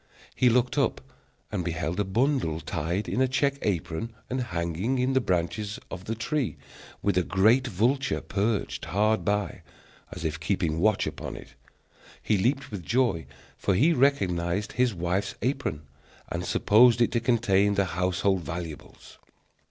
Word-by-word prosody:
He 125 - +4
looked 125 +3 +2
up 135 - +1 0.5
and 90 - -2
beheld 85 +1 -2
a - - +3
bundle 105 - 0
tied 85 +6 -2
in 130 - 0
a 130 - +4
check 140 +2 0
apron 90 +2 -2 0.2
and 130 0 0
hanging 85 +3 -2
in 125 +1 +1
the 130 - +3
branches 100 +2 -1
of 95 0 -7
the 115 - -2
tree, 125 +2 -2 0.5
with 100 -3 +2
a - - +1
great 110 +9 +3
vulture 120 +7 +1
perched 105 +2 -2
hard 110 +3 +1
by, 105 -1 -1 0.5
as 80 - -6
if 80 0 -2
keeping 80 -2 -1
watch 110 +3 +2
upon - - -5
it. - - -10 0.7
He 110 - +1
leaped 135 +5 0
with 100 -4 -5
joy, 115 - +1 0.3
for 100 - +1
he 155 - +4
recognized 100 - +1
his 125 -1 +2
wife's 90 +1 -2
apron, 125 - -1 0.5
and - - -3
supposed 115 +2 +5
it 120 - +3
to 120 - +1
contain 105 -4 +2
the 100 - +2
household 95 +2 0
valuables. 80 -2 -8
105 Hz, 155 wpm, -27 LUFS, 90-125 Hz, 0.7 s, supposed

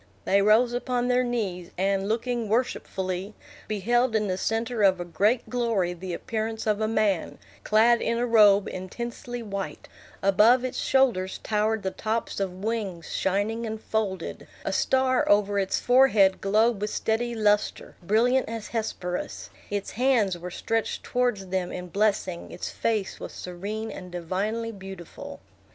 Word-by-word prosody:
They 200 +1 +4
rose 220 +4 +4
upon 245 0 -1
their 250 0 +3
knees, 200 -8 -3
and, 195 +1 0
looking 235 0 -1
worshipfully, 195 -4 -2 0.3
beheld 230 +3 +1
in 215 -1 +1
the 185 - 0
centre 225 +4 -1
of 190 -2 +4
a 175 - -4
great 210 +8 +1
glory 230 -8 0
the 175 0 -5
appearance 220 +2 -3
of 215 0 +1
a 215 - +2
man, 215 -5 0 0.3
clad 230 +2 +4
in 230 - 0
a 240 - +1
robe 210 -4 +5
intensely 235 +5 -6
white; 200 -2 -5 0.4
above 215 +6 +5
its 255 - -3
shoulders 235 -9 +2
towered 215 0 0
the 190 - -1
tops 220 +1 -2
of 190 -1 -3
wings 210 -7 -3
shining 210 +4 0
and 220 0 -4
folded; 205 -5 -3 0.2
a - - -1
star 260 -1 +2
over 205 0 +3
its 190 -1 0
forehead 245 -7 +4
glowed 215 +2 +2
with 210 - -1
steady 235 +3 -1
lustre, 210 -1 +1
brilliant 230 +8 +2
as 225 -1 -5
Hesperus; 185 -6 -4 0.2
its 205 -1 -3
hands 235 -6 +2
were 175 +1 -7
stretched 225 +5 -2
towards 245 -6 0
them 185 -1 -2
in 180 0 -6
blessing; 195 -3 0
its - - -5
face 215 -4 -1
was - - -7
serene 205 +5 -5
and 180 -2 -9
divinely 200 +7 -2
beautiful. 190 -4 -9
215 Hz, 150 wpm, -26 LUFS, 190-230 Hz, 0.4 s, robe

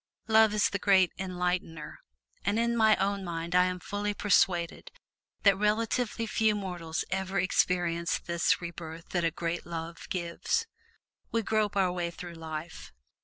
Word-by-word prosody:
Love 220 -1 +6
is 210 0 +2
the 200 - -1
great 190 -3 +4
enlightener. 180 -4 -3 0.4
And 200 +3 +1
in 235 +1 +1
my 220 -2 +5
own 200 0 -1
mind 170 -1 -4
I 180 0 +5
am 180 0 -2
fully 205 +2 -3
persuaded 180 -4 +2 0.5
that 200 - +8
comparatively 220 +3 0
few 220 -1 +2
mortals 175 -5 -3
ever 190 0 -1
experience 175 -2 +1
this 170 0 +1
rebirth 165 -1 -8
that 175 -2 0
a 165 - +3
great 170 +1 -3
love 165 0 -7
gives. 175 - -1 0.7
We 230 -1 0
grope 215 -1 0
our 185 -2 +3
way 175 -1 -2
through 170 0 -8
life. 160 -1 -7
180 Hz, 150 wpm, -29 LUFS, 170-205 Hz, 0.7 s, that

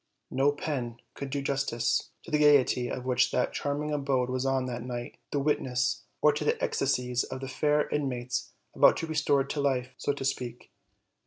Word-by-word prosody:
No 135 +2 +3
pen 130 -5 -3 0.2
could 140 - -6
do 140 0 -2
justice 135 -4 0
to 170 - -11
the 150 - +3
gayety 140 -4 +4
of 125 - -4
which 125 -1 +3
that 125 - 0
charming 150 +1 -2
abode 135 -3 0
was 130 +1 -1
oa 135 -1 +1
that 120 -2 -4
night 120 0 -6
the 145 - 0
witness, 130 -4 0 0.2
or 150 - +6
to 150 - -2
the 150 - +1
ecstasies 125 -2 0
of 130 - -6
the 135 - -5
fair 150 +2 +1
inmates 125 -4 -2 0.2
about - - +6
to - - -2
be - - -11
restored 145 -3 +2
to 145 - -1
life, 130 -2 0
so - - +1
to 140 -1 -4
speak. 125 -3 -3
135 Hz, 190 wpm, -29 LUFS, 125-145 Hz, 0.2 s, or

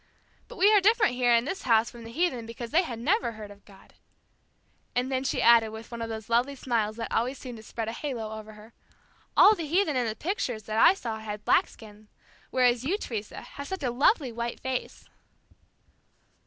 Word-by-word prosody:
But - - -12
we 410 +2 +5
are 415 - +6
different 425 - +3
here 245 -1 +2
in 235 0 +4
this 380 +7 -4
house 230 -2 +2
from 235 -1 -12
the 230 - -9
heathen 255 -6 -1
because 230 0 -7
they 330 +4 +4
had 250 -10 -5
never 295 - 0
heard 215 -1 -9
of 200 0 -16
God." 195 -2 -18 1.0
And 250 +2 0
then 260 0 0
she 265 - -1
added 235 -2 +6
with 220 +2 -10
one 235 -1 -6
of 230 - -4
those 220 -1 -6
lovely 245 +4 +1
smiles 225 -5 -1
that 230 0 -5
always 250 +4 0
seemed 250 -3 -8
to 220 - -12
spread 225 0 -5
a - - -2
halo 235 -5 -5
over 215 0 -11
her, 215 +2 -15 0.6
"All 425 - +8
the 335 -7 -5
heathen 330 -1 +1
in 245 -2 +1
the 220 - -3
pictures 285 - -3
that 215 +2 -2
I 375 - +7
saw 225 -10 -5
had 210 -1 -7
black - - +4
skins, 210 -1 -15 0.4
whereas 245 -2 +2
you, 350 +9 0
Teresa, 215 - -6
have 280 0 -9
such 380 -5 -5
a 250 - 0
lovely 270 - +2
white 235 +1 -4
face." 260 -1 -4
240 Hz, 210 wpm, -27 LUFS, 220-280 Hz, 1.0 s, All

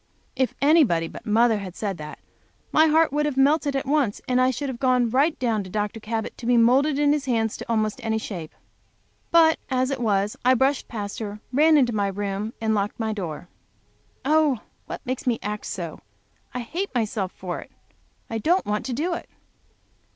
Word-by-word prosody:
If 260 -1 0
anybody 280 - +4
but - - -11
mother 225 0 +3
had 190 -3 -7
said 200 -5 -3
that, 150 0 -7 0.5
my 315 +1 +5
heart 315 -1 +3
would 295 0 +1
have 280 -3 -3
melted 285 +1 +3
at 270 - -1
once, 275 -7 +1
and 255 0 +2
I 255 - +4
should 280 +3 -3
have 255 -3 -5
gone 250 -3 +2
right 285 +6 +2
down 225 -5 0
to 185 - -10
Dr. 210 +3 -2
Cabot 220 0 -4
to 235 - -6
be 245 -1 +4
moulded 270 +5 +4
in 290 0 +3
his 295 -3 -1
hand 225 -4 +1
to - - -8
almost 215 -2 0
any 220 -1 0
shape. 180 -7 -6 0.7
But 325 -1 +5
as 260 0 +1
it 270 - -2
was 205 -2 +1
I 255 +1 +5
brushed 265 +2 +1
past, 205 -2 -5 0.3
ran 310 +3 +5
into 250 -4 +3
my 205 -2 +1
room, 200 +2 -3
and 220 -1 0
locked 205 +1 -1
my 220 -1 -1
door. 175 -5 -5 0.8
Oh, 300 -5 +3 0.3
what - - -7
makes 255 +1 -4
me 235 -2 +2
act 210 +1 -4
so! 170 -5 -5 0.5
I 250 - -4
hate 350 +12 -3
myself 215 -5 -1
for 180 -2 -5
it, - - -11 0.6
I 225 - -3
don't 350 - +2
want 210 +3 -2
to 255 - -2
do 325 +8 -1
it! - - -6
235 Hz, 195 wpm, -24 LUFS, 210-280 Hz, 0.8 s, my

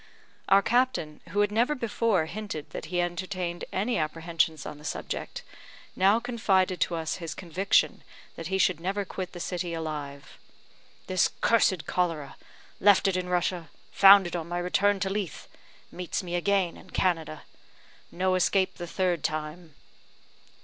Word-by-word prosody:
Our 195 0 +6
captain, 240 -11 0
who 205 - +1
had 205 0 +2
never 240 +7 +2
before 225 - +1
hinted 170 -3 -6
that - - -6
he 175 +3 -2
entertained 175 0 -3
any 210 +2 0
apprehensions 160 -1 -1
on 150 - -7
the - - -15
subject, - - -5 0.5
now 200 +4 +4
confided 195 -7 +1
to 170 - +1
us 160 -1 -3
his 165 -3 -6
conviction 185 +2 +1 0.3
that 165 - -6
he 190 +2 0
should 185 -2 +2
never 195 +3 -2
quit 185 -1 -6
the 175 - -8
city 175 -1 -3
alive: 145 -3 -6 0.7
"This 185 -2 +2
cursed 195 -7 +3
cholera! 165 -6 -1 0.4
Left 200 0 +5
it 190 - +1
in 180 0 -2
Russia 175 -2 -1 0.2
found 195 -1 +8
it 175 - -4
on 170 -1 -4
my 175 - -2
return 195 +3 +2
to 190 - 0
Leith 200 -4 -4 0.4
meets 180 +1 -4
me 175 -1 -6
again 185 0 +1
in - - -16
Canada. 165 -4 -1 0.7
No 185 +1 0
escape 185 +1 +2
the 175 - -6
third 175 -3 -1
time." 155 +1 -4
180 Hz, 155 wpm, -27 LUFS, 165-195 Hz, 0.7 s, found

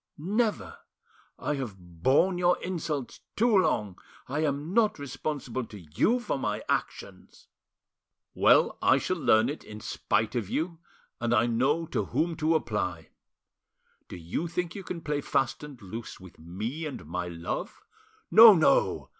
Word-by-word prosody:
"Never! 210 +7 -1 0.6
I - - -2
have 120 -7 -5
borne 115 - +1
your 180 0 +3
insults 160 -7 -4 0.2
too 230 0 +3
long. 105 - +1 0.3
I 145 +4 -3
am 150 +2 -1
not 220 -1 +3
responsible 140 -2 -4
to 105 - -11
you 95 - +1
for 240 - -3
my - - -2
actions." - - -4 0.9
"Well, - - +4
I - - +5
shall 185 - -2
learn 110 -6 +4
it, 145 +3 -5
in 105 0 -10
spite 110 +1 -1
of 115 -6 -2
you, 165 +1 -2 0.4
and 120 0 +1
I 120 +1 +4
know 135 +8 +1
to - - -2
whom 165 0 -1
to 160 +1 +2
apply. 105 - -2 1.0
Do - - -8
you 85 - -3
think 175 +1 -3
you 200 - -7
can 175 -2 -6
play 150 -2 -2
fast 135 -2 -1
and 145 -4 -10
loose 110 +3 -8
with 95 -2 -14
me 110 - -5
and 140 - -8
my 90 +3 -4
love? 85 -1 -5 0.5
No, 220 -1 +10
no! 160 - +2
140 Hz, 155 wpm, -28 LUFS, 105-170 Hz, 1.0 s, No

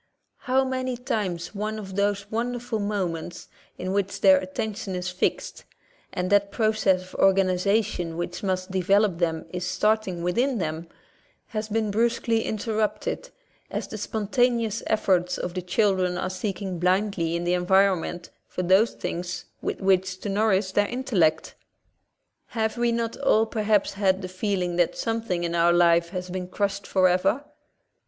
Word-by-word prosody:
How 265 +1 +3
many 255 -1 -2
times 200 -9 -3
one 215 +1 -3
of 190 -3 -7
those 200 0 0
wonderful 240 0 -2
moments, 185 -5 -3 0.3
in 185 +1 -3
which 200 -1 -1
their 190 -1 +7
attention 190 +1 -4
is 180 0 -3
fixed, 180 0 -2 0.5
and 180 +1 -2
that 200 0 +3
process 215 -5 +2
of 185 - -14
organization 190 -2 +2
which 175 0 -4
must 185 -1 -2
develop 190 0 +2
them 160 -2 0
is 180 0 -3
starting 195 -2 0
within 240 +9 +1
them, 160 -2 -3 0.6
has 215 0 -4
been 215 -1 0
brusquely 230 +1 +1
in 215 - -2
terrupted, 215 - -2 0.4
as - - -4
the - - -7
spontaneous 230 0 0
efforts 180 -4 +1
of 175 - -4
the 185 - -3
children 185 -1 +1
are 185 - -2
seeking 190 -1 -4
blindly 180 -2 +1
in 170 - -2
the 175 +1 +1
environ 190 +1 +4
ment 175 +1 -7 0.2
for 185 - -4
those 190 +6 +4
things 175 +1 -4 0.2
with - - -3
which 190 -1 +2
to 205 - -4
nourish 195 -2 +2
their 205 +1 +2
intellect. 195 -11 +1 1.0
Have 220 0 0
we 240 -1 +1
not 230 -1 -2
all 225 -5 +3
perhaps 215 -2 +1
had 195 -1 +1
the - - -3
feeling 185 -2 -2
that 175 -1 +2
something 225 -6 -1
in 170 0 -2
our 170 0 +4
life 170 -1 +4
has 180 0 -5
been 185 -1 -4
crushed 200 +1 -2
forever? 190 +7 +2
195 Hz, 155 wpm, -25 LUFS, 180-215 Hz, 1.0 s, their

